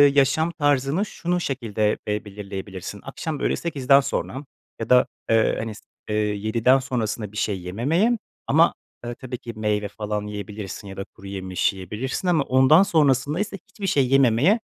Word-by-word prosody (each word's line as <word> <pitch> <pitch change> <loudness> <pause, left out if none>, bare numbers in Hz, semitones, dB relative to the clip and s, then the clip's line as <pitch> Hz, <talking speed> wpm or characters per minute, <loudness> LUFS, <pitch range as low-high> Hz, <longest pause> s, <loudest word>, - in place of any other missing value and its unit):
yaşam 145 +4 +3
tarzını, 145 +3 +1
şunu 180 -2 -2
şekilde 110 -7 -1
be 105 0 -2
belirleyebilirsin, 100 -1 -7
akşam, 150 +2 -5
böyle, - - +1
8'den 140 -4 +3
sonra 135 0 -3 0.3
ya 115 - -4
da, 125 0 +6 0.2
eee, 115 0 +3
hani, 110 -1 -4
s - - -13 0.3
eee, 105 - 0
7'den 110 +5 +2
sonrasına 115 -5 -3
bir 105 - -9
şey 100 -5 -1
yememeye 155 - +1 0.3
ama, 160 +4 +5 0.3
eee, 120 - -4
tabii 125 -1 -6
ki 120 -2 -8
meyve 105 -1 0
falan 105 0 -4
yiyebilirsin 105 -1 -6
ya 95 - -9
da 95 - -3
kuruyemiş 95 -1 -2
yiyebilirsin 105 - -4
ama 165 -5 +3
ondan 130 +8 +6
sonrasındaysa 155 - +1
hiçbir 200 -2 -5
şey 135 -6 +2
yememeye, 135 - +4
120 Hz, 155 wpm, -23 LUFS, 105-145 Hz, 0.3 s, da